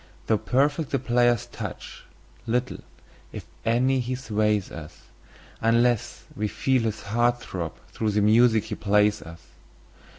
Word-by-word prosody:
Though 110 -2 +2
perfect 145 +3 +1
the 135 - +1
player's 120 -2 +2
touch, - - -8 0.4
little, 125 +2 -1 0.5
if - - -8 0.2
any, 130 +3 +2
he 125 +1 -2
sways 105 -5 0
us, 75 -2 -10 0.6
Unless 115 0 +1
we 105 +1 -1
feel 130 +4 +1
his 110 -1 -3
heart 120 +4 +1
throb 85 -8 -5
through 110 - -2
the 105 0 +1
music 110 +1 +4
he - - -6
plays 105 -2 +2
us. 80 +2 -11
115 Hz, 135 wpm, -25 LUFS, 105-125 Hz, 0.6 s, music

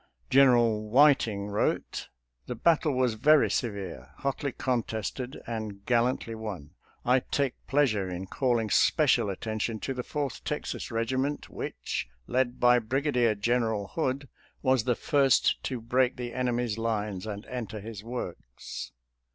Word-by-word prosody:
General 120 -5 +4
Whiting 115 -6 +4
wrote: 105 - -1 0.2
" - - -49
The - - -3
battle 155 +3 +3
was 125 -2 +2
very 150 +7 +4
severe, 100 - -3
hotly 140 +1 -2
contested, 125 +1 -3
and 110 -3 -5
gallantly 120 -1 +1
won. 105 -10 -6 0.3
I 125 +2 +5
take 135 0 -1
pleasure 115 -10 +2
in 90 +1 -4
calling 115 0 0
special 100 - +4
attention 110 +3 -3
to 135 - -2
the 125 - -3
Fourth 140 0 -4
Texas - - -4
regiment, 130 +5 -1
which, - - -4 0.2
led 125 - 0
by 125 0 +6
Briga 135 +6 -1
dier 120 -4 +3
General 110 -1 0
Hood, 140 -3 -2 0.4
was 130 -4 +3
the 125 -2 +2
first 135 -1 +3
to 130 -2 -2
break 125 +2 +1
the 120 -1 -5
enemy's 120 -3 -1
lines 105 -3 -2
and 105 0 -5
enter 110 -4 -5
his 105 -1 -8
works." 85 - -7
120 Hz, 140 wpm, -28 LUFS, 105-130 Hz, 0.4 s, by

